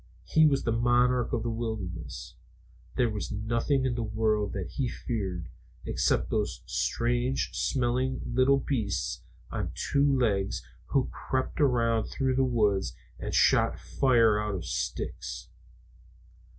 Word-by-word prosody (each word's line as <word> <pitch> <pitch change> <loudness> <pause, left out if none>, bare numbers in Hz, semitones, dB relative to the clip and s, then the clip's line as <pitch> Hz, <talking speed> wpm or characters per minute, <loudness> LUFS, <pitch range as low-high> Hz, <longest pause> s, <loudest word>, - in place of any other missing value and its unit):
He 155 -1 +5
was 140 -2 +1
the 115 - 0
monarch 120 +1 +2
of 110 - -1
the 120 - -1
wilderness. 95 -10 -5 0.6
There 120 -3 +2
was 105 -1 -4
nothing 115 +6 0
in 130 - +1
the 120 - -2
world 110 -1 0
that 95 -4 -4
he 135 -3 -1
feared, 95 -8 -4 0.4
except - - +1
those - - -1
strange 120 +2 0
smelling 130 +1 0
little 130 +3 +3
beasts 115 -8 -2 0.3
on - - -3
two 140 -1 +2
legs 100 -6 0 0.2
who 135 -2 +1
crept 130 +3 -2
around 115 -5 +3
through 130 -2 0
the 135 - +3
woods 105 -6 +1 0.2
and - - -4
shot - - +4
fire 115 -5 +3
out 105 -2 -2
of 85 -4 -5
sticks. - - -4
120 Hz, 135 wpm, -28 LUFS, 105-130 Hz, 0.6 s, He